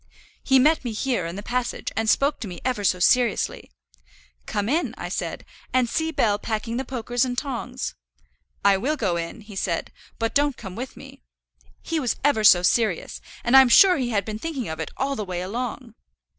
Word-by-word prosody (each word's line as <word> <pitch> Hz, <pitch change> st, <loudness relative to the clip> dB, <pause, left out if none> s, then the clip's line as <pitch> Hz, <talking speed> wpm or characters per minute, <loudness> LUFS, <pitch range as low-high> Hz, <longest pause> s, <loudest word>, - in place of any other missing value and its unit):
"He 265 Hz, -, +4 dB
met 300 Hz, +4 st, +4 dB
me 240 Hz, -3 st, -3 dB
here, 230 Hz, -6 st, -1 dB
in 170 Hz, -, -6 dB
the 205 Hz, -, -6 dB
passage, 250 Hz, +1 st, -2 dB
and 225 Hz, 0 st, 0 dB
spoke 280 Hz, +5 st, +2 dB
to 220 Hz, -, -5 dB
me 180 Hz, -, -8 dB
ever 250 Hz, -5 st, -1 dB
so 185 Hz, -, +3 dB
seriously. 235 Hz, +5 st, +2 dB, 0.8 s
'Come 205 Hz, 0 st, -2 dB
in,' 315 Hz, +8 st, 0 dB
I -, -, -5 dB
said, -, -, -4 dB, 0.3 s
'and 255 Hz, -1 st, +3 dB
see 320 Hz, +6 st, -1 dB
Bell 210 Hz, -9 st, +1 dB
packing 225 Hz, +2 st, -3 dB
the 265 Hz, -, -1 dB
pokers 245 Hz, -1 st, -1 dB
and 250 Hz, -1 st, -2 dB
tongs.' 255 Hz, -, -4 dB, 0.7 s
'I 200 Hz, -1 st, +6 dB
will 285 Hz, +10 st, -1 dB
go 195 Hz, -9 st, 0 dB
in,' 170 Hz, +4 st, -5 dB
he 210 Hz, -1 st, -12 dB
said, 175 Hz, -3 st, -2 dB, 0.3 s
'but 225 Hz, 0 st, -1 dB
don't 285 Hz, -2 st, +1 dB
come 190 Hz, -4 st, -8 dB
with 250 Hz, +3 st, -7 dB
me.' 275 Hz, 0 st, -13 dB, 0.6 s
He 330 Hz, -1 st, -1 dB
was 255 Hz, -5 st, 0 dB
ever 280 Hz, -6 st, +2 dB
so 180 Hz, -4 st, +7 dB
serious, 210 Hz, -2 st, 0 dB, 0.2 s
and 240 Hz, +2 st, +3 dB
I'm 265 Hz, -1 st, +8 dB
sure 365 Hz, +9 st, +7 dB
he 250 Hz, -3 st, -1 dB
had 205 Hz, -4 st, 0 dB
been 215 Hz, -1 st, -5 dB
thinking 285 Hz, -6 st, -4 dB
of 160 Hz, -, -5 dB
it 160 Hz, -, -3 dB
all 275 Hz, +1 st, -1 dB
the 215 Hz, -, -3 dB
way 180 Hz, -3 st, -4 dB
along." 235 Hz, +3 st, -5 dB
235 Hz, 200 wpm, -24 LUFS, 205-265 Hz, 0.8 s, I'm